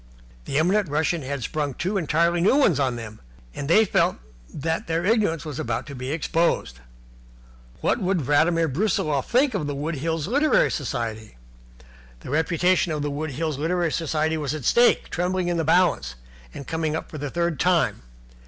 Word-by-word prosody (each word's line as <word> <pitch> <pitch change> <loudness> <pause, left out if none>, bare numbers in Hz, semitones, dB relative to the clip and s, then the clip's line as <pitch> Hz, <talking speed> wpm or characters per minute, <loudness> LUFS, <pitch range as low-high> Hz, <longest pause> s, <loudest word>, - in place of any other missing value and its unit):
The 135 - -2
eminent 185 +3 +2
Russian 160 +3 0
had 135 -1 -4
sprung 145 -4 -2
two 190 +5 -2
entirely 170 -1 +1
new 200 +9 +4
ones 215 - +3
on 130 -3 +1
them, 110 -2 -9 0.3
and 140 - -5
they 215 +6 +6
felt - - +2 0.4
that 160 +3 -3
their 165 +1 -1
ignorance 205 -7 +1
was 150 -1 -6
about 155 - -2
to 145 - -9
be 130 0 -5
exposed. 160 - 0 1.0
What - - +1
would 185 -2 0
Vladimir 160 +4 +2
Brusiloff 155 -3 0
think 255 +2 +3
of 180 -8 -2
the 145 - -3
Wood 150 +4 -3
Hills 160 +1 -2
Literary 285 +7 +3
Society? 110 - -4 0.8
The - - -8
reputation 170 +3 +2
of 150 -2 -2
the 145 - -2
Wood 155 +2 -3
Hills 155 0 -3
Literary 170 +1 0
Society 160 0 -1
was 150 -1 -2
at 145 -6 -7
stake, 240 0 +3
trembling 180 +1 -1
in 175 - 0
the 165 - 0
balance, 160 - +2 0.4
and 140 - -9
coming 160 0 -2
up 160 - -5
for 155 - -7
the 145 0 -4
third 170 -1 -1
time. 175 - +2
160 Hz, 180 wpm, -24 LUFS, 145-175 Hz, 1.0 s, they